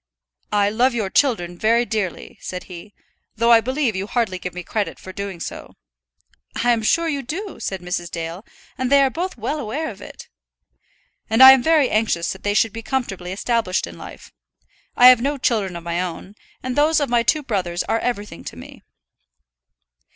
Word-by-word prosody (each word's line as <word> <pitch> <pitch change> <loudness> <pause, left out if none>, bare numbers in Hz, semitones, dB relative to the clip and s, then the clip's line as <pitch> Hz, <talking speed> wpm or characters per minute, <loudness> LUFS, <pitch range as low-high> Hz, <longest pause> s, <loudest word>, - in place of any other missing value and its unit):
"I 205 0 +2
love 240 +3 +2
your 210 -5 -2
children 175 -11 +1
very 230 +2 +3
dearly," 210 -7 -4
said 180 0 -6
he, 180 +3 -11 0.4
"though 230 +1 +3
I 230 -1 +7
believe 260 -2 -1
you 190 +1 -3
hardly 215 -6 -1
give 180 -1 -6
me 180 - -6
credit 210 +3 -3
for 190 - -11
doing 200 -3 -6
so." - - -8 0.9
"I 245 - +4
am 230 -2 +1
sure 335 +10 +2
you 285 -3 -2
do," 360 - -6
said 190 -2 -4
Mrs. 180 -1 -4
Dale, 165 +3 -6 0.4
"and 255 0 -1
they 280 0 +6
are 265 - +2
both 360 +2 -4
well 245 +7 -3
aware 285 +6 -3
of - - -14
it." - - -11 1.0
"And 225 +4 +6
I 265 - +13
am 265 -1 +5
very 310 -2 +3
anxious 215 -6 0
that 190 - -14
they 205 0 -1
should 220 -1 +2
be 230 - -6
comfortably 195 -8 -3
established 210 -1 -1
in - - -11
life. - - -11 0.7
I 245 - +6
have 250 -2 +6
no 285 +3 -1
children 210 -8 0
of 170 - -7
my 170 +1 -2
own, 185 +2 -6 0.3
and 255 0 -3
those 310 +2 +3
of 285 - 0
my 240 0 +2
two 300 +6 +1
brothers 180 -8 -2
are 225 - 0
everything 210 -8 -4
to - - -7
me." 85 - -12
225 Hz, 195 wpm, -21 LUFS, 185-260 Hz, 1.0 s, I